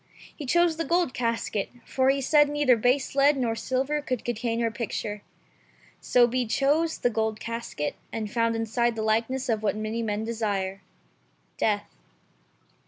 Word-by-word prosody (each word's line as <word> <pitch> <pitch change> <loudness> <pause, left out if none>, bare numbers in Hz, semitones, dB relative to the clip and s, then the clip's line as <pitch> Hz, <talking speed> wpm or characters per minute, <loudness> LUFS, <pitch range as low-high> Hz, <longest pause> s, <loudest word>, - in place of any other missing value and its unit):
He 290 - -7
chose 345 +2 +3
the 330 - -1
gold 340 -5 +1
casket, 230 -4 -1 0.2
for 260 0 +1
he 275 0 +2
said 295 +2 +4
neither 290 -4 +3
base 250 +4 +1
lead 280 +1 +4
nor 240 -3 0
silver 265 +5 -1
could 255 -4 -3
contain 235 0 -1
her 230 -1 +1
picture. 210 -2 -4 0.8
So 245 -1 +4
he 250 0 -1
chose 300 +7 +1
the 245 - +1
gold 220 -1 -1
casket, 230 -11 -4 0.2
and 215 -2 -4
found 230 -1 +1
inside 230 +1 0
the 220 - -2
likeness 230 +5 0
of 220 -3 0
what 215 - 0
many 215 +2 -3
men 215 -1 -2
desire 200 -4 -2 0.4
— - - -40
death. 205 -2 +1
235 Hz, 165 wpm, -26 LUFS, 220-270 Hz, 0.8 s, said